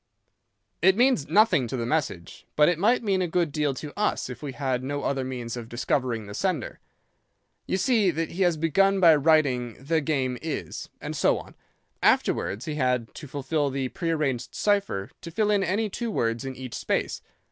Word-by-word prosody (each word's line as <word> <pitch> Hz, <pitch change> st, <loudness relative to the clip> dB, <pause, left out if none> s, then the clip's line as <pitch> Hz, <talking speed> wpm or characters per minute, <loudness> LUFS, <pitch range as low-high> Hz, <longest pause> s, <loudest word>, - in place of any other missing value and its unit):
"'It 190 Hz, +3 st, +5 dB
means 245 Hz, -, +3 dB
nothing 180 Hz, -, +4 dB
to 130 Hz, -, -4 dB
the 115 Hz, -, -2 dB
message, 120 Hz, -, -3 dB
but 150 Hz, 0 st, +5 dB
it 175 Hz, -2 st, +1 dB
might 235 Hz, +6 st, +3 dB
mean 195 Hz, -3 st, +1 dB
a 180 Hz, -, 0 dB
good 170 Hz, -2 st, 0 dB
deal 150 Hz, -1 st, 0 dB
to 145 Hz, +2 st, -7 dB
us 210 Hz, -9 st, -1 dB
if 120 Hz, -, -9 dB
we 145 Hz, -2 st, -4 dB
had 130 Hz, -2 st, -2 dB
no 145 Hz, +1 st, -3 dB
other 135 Hz, -1 st, -1 dB
means 125 Hz, -3 st, -5 dB
of 115 Hz, -2 st, -7 dB
discovering 120 Hz, -2 st, -1 dB
the 100 Hz, -, -9 dB
sender. 165 Hz, -, -2 dB, 0.9 s
You -, -, 0 dB
see 220 Hz, -2 st, +3 dB
that 165 Hz, -1 st, -2 dB
he 185 Hz, -, -4 dB
has 175 Hz, -3 st, +3 dB
begun 195 Hz, +5 st, +3 dB
by 165 Hz, -4 st, +7 dB
writing 140 Hz, -6 st, +2 dB
"The... 160 Hz, +4 st, 0 dB
game... 135 Hz, -4 st, -1 dB
is," 160 Hz, -2 st, -5 dB
and -, -, -5 dB
so -, -, +3 dB
on. -, -, -10 dB, 0.5 s
Afterwards 105 Hz, +8 st, +1 dB
he 155 Hz, -, -3 dB
had, 125 Hz, -5 st, 0 dB
to 150 Hz, -, -9 dB
fulfill 145 Hz, +2 st, -1 dB
the 135 Hz, -1 st, -2 dB
prearranged 155 Hz, -7 st, -2 dB
cipher, 200 Hz, -, 0 dB
to -, -, -7 dB
fill 210 Hz, +5 st, +1 dB
in 200 Hz, -2 st, +2 dB
any 205 Hz, +4 st, 0 dB
two 230 Hz, +4 st, -4 dB
words 115 Hz, -, -1 dB
in 135 Hz, -1 st, -5 dB
each 130 Hz, -2 st, -8 dB
space. -, -, -2 dB
150 Hz, 190 wpm, -26 LUFS, 130-180 Hz, 0.9 s, by